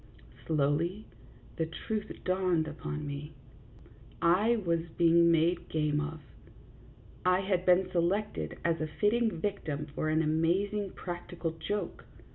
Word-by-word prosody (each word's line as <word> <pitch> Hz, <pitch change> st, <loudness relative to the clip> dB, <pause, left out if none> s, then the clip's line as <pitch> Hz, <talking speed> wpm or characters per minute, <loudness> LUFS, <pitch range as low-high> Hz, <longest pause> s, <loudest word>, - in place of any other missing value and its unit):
Slowly 160 Hz, +7 st, +1 dB, 0.5 s
the 160 Hz, -, 0 dB
truth 210 Hz, +6 st, -4 dB
dawned 185 Hz, -3 st, +1 dB
upon 150 Hz, 0 st, -5 dB
me: 145 Hz, +1 st, -6 dB, 0.9 s
I 200 Hz, +8 st, +4 dB
was 170 Hz, -1 st, +2 dB, 0.2 s
being 170 Hz, 0 st, +6 dB
made 165 Hz, +2 st, +2 dB
game 150 Hz, -1 st, +1 dB
of; 155 Hz, +1 st, -5 dB, 1.0 s
I 180 Hz, +1 st, +3 dB
had 185 Hz, -2 st, 0 dB
been 180 Hz, +1 st, +5 dB
selected 175 Hz, -, 0 dB
as 165 Hz, -2 st, +1 dB
a 155 Hz, -, 0 dB
fitting 210 Hz, +9 st, +2 dB
victim 160 Hz, -6 st, -2 dB
for 155 Hz, -, -1 dB
an 155 Hz, +1 st, +2 dB
amazing 185 Hz, +6 st, +1 dB
practical 175 Hz, -1 st, -5 dB
joke. 180 Hz, +3 st, -4 dB
170 Hz, 120 wpm, -31 LUFS, 155-190 Hz, 1.0 s, being